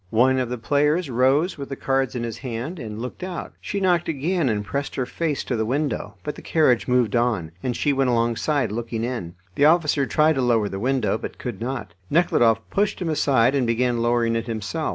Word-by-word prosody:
One 130 +5 +3
of 125 -2 -1
the 125 - -3
players 145 +6 +1
rose 135 +8 +2
with 140 - -6
the 135 - -4
cards 135 -3 0
in 120 - -2
his 115 -1 -5
hand, 130 +7 -5
and 110 -3 -6
looked 125 +8 -6
out. 185 -2 -5
She 200 - -3
knocked 180 -3 +2
again, 160 0 0
and 105 -2 -1
pressed 140 +7 -3
her 130 - -1
face 155 +1 -2
to 125 - -2
the 110 - 0
window, 140 +6 -2
but 150 - -3
the - - -11
carriage 140 -7 +2
moved 125 -4 +2
on, 115 -9 0
and 125 -2 -2
she 145 - +1
went 135 -1 +1
alongside 120 +3 +1
looking 115 0 -3
in. 115 -9 -4 0.2
The 145 - +3
officer 150 -4 +3
tried 155 +6 +3
to 135 - -1
lower 115 -4 +2
the 95 - -5
window, 120 -3 0
but - - -7
could 120 -6 -6
not. 120 -7 -4 0.2
Nekhludoff 120 -9 +3
pushed 205 +1 0
him 175 -3 -2
aside 135 -5 +3
and 135 -4 +1
began 120 0 +1
lowering 120 -1 +2
it 115 +1 -2
himself. 115 +8 -3
125 Hz, 215 wpm, -23 LUFS, 115-145 Hz, 0.2 s, One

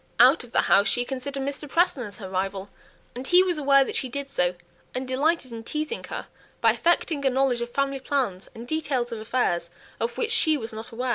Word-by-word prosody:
Out 255 +4 +7
of 240 - -14
the - - +3
house 200 +1 +4
she 245 +5 0
considered 270 +1 -4
Mr. 280 +1 -5
Preston 340 -5 +2
as 200 - -10
her 195 - -7
rival, 195 +1 -3 0.4
and 255 +2 -6
he 360 +1 +7
was 355 -4 0
aware 275 -1 +5
that - - -5
she 260 - -1
did 280 +2 -4
so, 180 -9 0 0.4
and 255 +1 -3
delighted 275 +1 +1
in 225 -1 -7
teasing 305 - -3
her - - -6 0.3
by - - +5
affecting 335 -3 +1
a 270 - +4
knowledge 260 -2 +1
of 240 - -3
family 275 0 0
plans 255 -9 -2
and 230 +2 -9
details 275 -6 -1
of 230 - -4
affairs 215 -7 0 0.3
of 230 - -2
which 460 -1 0
she 320 -9 +4
was 225 -4 -6
ignorant. 230 +3 -5
260 Hz, 215 wpm, -25 LUFS, 230-285 Hz, 0.4 s, Out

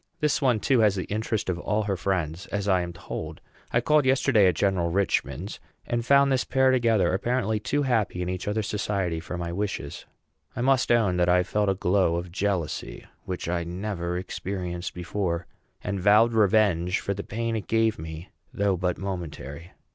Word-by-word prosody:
This 150 -3 +1
one, 125 -5 +3
too, 130 +3 +2
has 105 -3 +4
the 95 - -2
interest 110 0 -2
of 90 -2 -1
all 105 +4 0
her 100 -1 -1
friends, 90 -2 -2
as 100 -1 -3
I 95 -2 +3
am 85 0 -4
told. 85 - -7 0.3
I 120 - +2
called 150 +4 +3
yesterday 130 -6 +4
at 90 - +2
General 90 -2 +1
Richman's, 90 -2 -1 0.3
and 120 0 -1
found 140 +2 +4
this 130 -2 +2
pair 130 0 +3
together, 115 -8 +2
apparently 110 +1 0
too 145 +7 0
happy 110 -8 0
in - - -4
each 90 +1 -4
other's 105 0 -1
society 100 -5 -1
for 90 +1 -6
my 85 -1 -4
wishes. 100 +2 -4 0.5
I - - -3
must 130 0 +3
own 105 -7 +3
that 90 0 +2
I 90 0 +4
felt 105 +2 0
a 95 - +2
glow 90 -2 +2
of 85 0 -4
jealousy, 95 -3 -2 0.2
which 90 -2 -4
I 85 0 -1
never 90 0 -3
experienced 90 -1 -4
before, 90 -1 -2 0.4
and 100 -1 -2
vowed 105 +4 +5
revenge 100 -4 +3
for 100 - -2
the 100 - -5
pain 115 +1 -3
it 110 - -4
gave 110 -3 +2
me, 80 +2 -8 0.2
though 100 -6 +1
but 90 0 -1
momentary. 85 -4 -6
100 Hz, 185 wpm, -26 LUFS, 90-110 Hz, 0.5 s, vowed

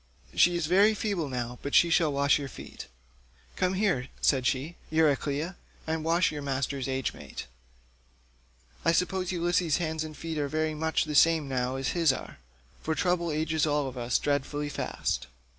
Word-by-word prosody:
She 175 0 +4
is 170 -2 0
very 200 +6 +4
feeble 195 -8 -2
now, 120 -1 -4
but 140 - -2
she 170 - +6
shall 165 -3 +3
wash 140 +1 +3
your 140 - -4
feet." 130 - -10 0.7
"Come 185 0 +1
here," 185 -11 +1
said 130 -3 +2
she, 145 +6 -1
"Euryclea, 155 +2 +1 0.3
and 160 0 -2
wash 170 +4 +2
your 150 -1 -5
master's 135 -1 -2
age 130 -1 -1
mate; - - -8 1.4
I 165 - +3
suppose 180 +1 0
Ulysses' 175 -2 +1
hands 160 -2 -2
and 155 -2 -8
feet 165 0 -4
are 145 - 0
very 155 +2 -1
much 160 +1 0
the 155 - -4
same 160 0 +4
now 130 -1 -1
as 135 -1 -1
his 165 -5 +3
are, 130 - -7 0.4
for 160 - -1
trouble 175 +1 +1
ages 155 0 0
all 145 -1 +1
of 130 - -7
us 120 0 0
dreadfully 145 +1 -1
fast." 145 - -2
155 Hz, 175 wpm, -28 LUFS, 140-170 Hz, 1.4 s, she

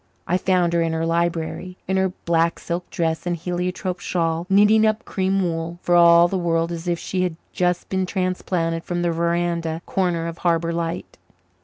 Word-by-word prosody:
I 175 - 0
found 180 -2 +2
her 170 - +2
in 165 -1 0
her 160 0 -1
library, 170 +2 -1
in 190 - 0
her 190 0 +2 0.2
black 170 0 +2
silk 175 +1 -4
dress 165 0 -2
and 175 - 0
heliotrope 180 +2 -3
shawl, 165 -1 -1
knitting 210 +3 +5
up 215 0 +1
cream 190 0 0
wool, 165 0 -3
for 175 - +1
all 170 0 +7
the 190 +1 -2
world 165 -1 0
as 170 +1 -5
if 175 -1 +1
she 185 +2 -3
had 180 -3 -1 0.2
just 180 -1 0
been 190 -1 -1
transplanted 180 -3 -1
from 175 0 -2
the 170 - +1
veranda 170 0 -1
corner 175 -3 0
of 170 0 -6
Harbour 170 -1 +1
Light. 170 +1 -4
175 Hz, 185 wpm, -22 LUFS, 165-180 Hz, 0.2 s, all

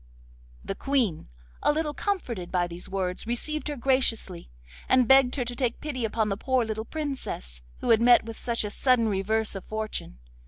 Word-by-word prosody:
The - - -2
Queen, 235 - 0 0.3
a - - +4
little 300 0 -1
comforted 245 - -3
by 180 -1 +2
these 175 0 -7
words, 185 0 -2
received 305 +7 0
her 295 - -3
graciously, 235 -8 0 0.4
and 255 -2 +5
begged 265 -1 +6
her 250 -4 -1
to 245 +1 -5
take 245 -2 -1
pity 255 -6 -3
upon 220 -1 0
the 195 - -1
poor 255 +1 +1
little 220 0 -4
Princess, 260 - -5 0.2
who - - +1
had 225 0 +5
met 240 0 +6
with 225 0 -6
such 235 0 -1
a 210 - -4
sudden 245 -2 +3
reverse 215 +3 0
of 195 - -6
fortune. 215 - -5
230 Hz, 185 wpm, -27 LUFS, 200-265 Hz, 0.4 s, begged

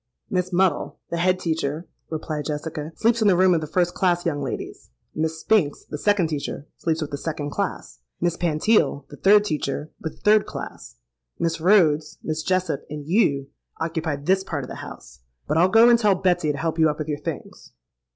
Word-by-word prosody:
—'Miss 185 -1 0
Muddle, 185 0 +1
the 170 - -1
head 185 +2 +2
teacher,' 160 -2 -2 0.2
replied 155 -2 -4
Jessica, 150 +1 -4
'sleeps 230 +1 +2
in 215 - +4
the 185 -3 +5
room 185 0 +5
of 165 - +1
the 155 - -4
first 175 +2 +1
class 175 -2 +1
young 145 -4 -1
ladies: 135 - -6 0.2
Miss 160 +1 -2
Spinks, 185 -10 +1
the 150 - -6
second 205 -2 +2
teacher, 150 -2 -4
sleeps 160 -1 -1
with 150 - -7
the 145 - -4
second 150 -2 -4
class; - - -4 0.2
Miss 175 -1 0
Pantile, 170 -1 +1
the - - -11
third 205 +1 +5
teacher, 150 -3 -3
with 160 - -5
the - - -25
third 210 0 +4
class; - - -8 0.4
Miss 165 -1 -1
Rhodes, 160 -5 +3
Miss 155 0 -2
Jessop, 185 -3 -1
and 150 -1 -6
you 140 -8 +2 0.3
occupy 160 -2 -2
this 185 +7 +1
part 150 -7 -4
of - - -8
the - - -7
house. - - -10 0.3
But 160 - +1
I'll 180 +2 +5
go 225 +4 +7
and 240 -1 +6
tell 210 -4 +4
Betsy 175 -4 +1
to 145 - -5
help 165 +2 -2
you 160 -1 +5
up 150 - -3
with 155 - -4
your 145 -1 -2
things.' - - -7
165 Hz, 200 wpm, -23 LUFS, 150-185 Hz, 0.4 s, go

